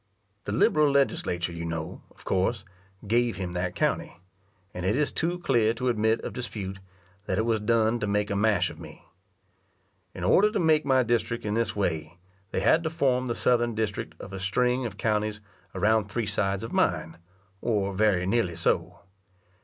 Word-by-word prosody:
The - - -3
liberal 150 +7 +3
Legislature 90 -11 0
you 85 0 -5
know, 80 -1 -5
of - - -20
course, 95 +2 0 0.4
gave 120 +2 +1
him 90 -2 -4
that 90 0 -2
county; - - -1 0.5
and 90 - -5
it 95 +5 +1
is 145 +1 +1
too 175 +2 -1
clear 115 -10 +2
to 125 +2 -1
admit 110 -1 +2
of - - -6
dispute, 100 -6 -5 0.5
that 95 - 0
it 110 - +1
was 115 -2 +1
done 115 +2 +2
to 105 - -2
make 105 0 0
a - - 0
mash 105 -2 +2
of - - -13
me. - - -12 1.1
In 90 - -6
order 205 - +4
to 210 - +1
make 160 -3 +3
my 130 -2 +4
district 115 0 -1
in 105 - -1
this 115 0 0
way, 85 -4 -2 0.3
they - - -2
had 160 - +4
to 160 - -2
form 130 -5 +1
the 120 - -1
southern 120 -2 +2
district 100 -7 -3
of 100 - -9
a 95 - -5
string 125 +6 +1
of 100 -2 -10
counties 105 -1 0 0.4
around 110 0 +2
three 115 +3 -2
sides 100 -1 -1
of 115 - -6
mine, 80 +1 0 0.4
or 100 -4 0
very 95 -3 +2
nearly 95 -4 +1
so. 85 - -1
110 Hz, 185 wpm, -27 LUFS, 95-120 Hz, 1.1 s, order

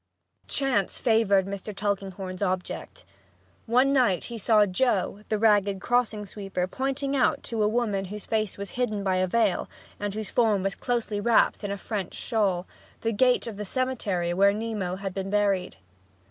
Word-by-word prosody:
Chance 260 -9 0
favored 220 -5 +3
Mr. 200 +1 -6
Tulkinghorn's 195 -2 -3
object. 185 -2 -3 0.6
One 255 +4 +4
night 240 -10 +3
he 235 -2 -6
saw 215 0 +4
Joe, 200 -1 0
the 215 - +1
ragged 205 -2 +3
crossing 225 -2 0
sweeper 195 -2 -3
pointing 270 +6 -2
out 255 -3 +2
to 230 -2 -1
a 210 - +4
woman 210 -4 0
whose 205 +2 -7
face 215 -3 -1
was 200 -1 -6
hidden 215 -5 -1
by 190 -1 +1
a 185 0 +2
veil, 215 0 +1 0.3
and 205 -1 -2
whose 215 -2 -4
form 215 -5 +2
was 195 0 0
closely 230 -4 -2
wrapped 230 0 +3
in 205 - -2
a 200 - -2
French 200 -3 -4
shawl, 195 -6 0 0.4
the 225 - 0
gate 250 +3 +3
of 225 -4 -6
the 210 - -4
cemetery 205 -7 -1
where 200 +2 +4
Nemo 210 -4 -3
had 195 0 -5
been 195 0 -4
buried. 200 -3 +1
205 Hz, 170 wpm, -26 LUFS, 195-230 Hz, 0.6 s, One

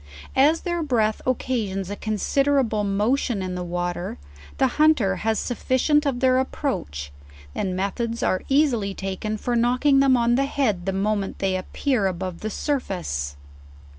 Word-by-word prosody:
As 300 +5 +4
their 345 -1 -2
breath 225 -8 +1
occasions 215 -7 -1
a - - -3
considerable 225 +1 +1
motion 210 +2 0
in 185 -1 -3
the 180 0 -3
water, 175 0 -3 0.4
the 270 - +3 0.2
hunter 245 -12 +4
has 220 +3 0
sufficient 260 +6 +1
of 250 -3 -1
their 255 -1 +4
approach, 75 - -3 0.4
and 185 - -2
methods 230 +5 -2
are 185 - +1
ea 285 +3 +5
sily 210 -8 -2
taken 195 +3 -3
for 240 +3 -2
knocking 250 +4 +3
them 270 -2 +5
on 235 0 +2
the 270 +3 +2
head 215 -11 -1
the - - +2
moment 200 +1 -1
they 190 -1 0
appear 210 +3 0
above 185 -1 -4
the 215 - -3
surface. 180 - -2
220 Hz, 155 wpm, -24 LUFS, 190-265 Hz, 0.4 s, ea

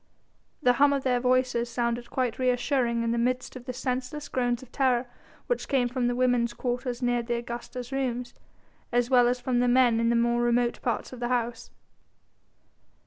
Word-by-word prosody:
The 250 - +5
hum 285 0 +6
of 275 -1 -1
their 250 -2 +2
voices 250 -1 +1
sounded 240 0 -2
quite 250 -3 -1
reassuring 245 -1 +1
in 230 - 0
the 235 - 0
midst 255 +2 -1
of 250 -1 -9
the 255 - -3
senseless 255 +3 -4
groans 245 0 -1
of 255 - -16
terror 255 -3 +1 0.4
which - - -2
came 260 -3 +2
from 245 0 -1
the 245 - 0
women's 245 -2 +2
quarters 245 0 -3
near 245 0 +2
the 235 0 -2
Augusta's 240 +2 -6
rooms, 250 -2 -2 0.6
as 245 +1 +1
well 245 -2 +6
as 250 +1 0
from 245 0 0
the 245 - +2
men 245 -2 +4
in 230 0 +2
the 235 - +2
more 235 0 +2
remote 240 0 +1
parts 245 +1 -2
of 250 - -9
the 240 - -1
house. 240 -1 -2
245 Hz, 190 wpm, -27 LUFS, 240-255 Hz, 0.6 s, hum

